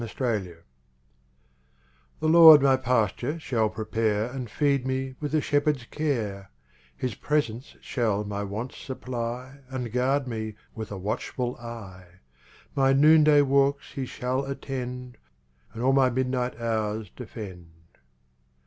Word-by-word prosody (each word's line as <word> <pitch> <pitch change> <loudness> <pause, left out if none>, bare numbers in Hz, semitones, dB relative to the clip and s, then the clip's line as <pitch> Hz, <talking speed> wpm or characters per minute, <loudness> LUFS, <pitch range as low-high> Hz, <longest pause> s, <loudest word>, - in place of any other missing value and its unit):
7 - - -4
Autoplay 105 -9 -2 1.6
The 155 - +1
Lord 160 -3 +9
my 135 -1 +5
pasture 125 +2 0
shall 115 -8 0
prepare 110 +1 -1
And 125 -3 -5
feed 140 +1 +1
me 130 0 -2
with 150 0 -2
a 155 - +3
shepherd's 145 -4 +1
care; 110 -11 -3 0.5
His 130 - -2
presence 130 -4 -2
shall 110 -5 -1
my 100 0 -4
wants 105 +6 -5
supply 125 0 -5
And 125 -3 -4
guard 130 +3 +1
me 110 -3 -4 0.2
with 110 -2 -7
a 100 - -4
watchful 120 +5 -3
eye; 95 -6 -10 0.6
My 135 -1 +3
noonday 150 +1 +6
walks 140 +1 +1
He 135 -2 -4
shall 130 +3 -2
attend 125 -3 -5 0.5
And 115 +1 -6
all 135 +1 +4
my 135 -1 +4
midnight 125 0 -1
hours 110 -2 -2
defend. 100 -8 -9
125 Hz, 130 wpm, -26 LUFS, 110-135 Hz, 1.6 s, Lord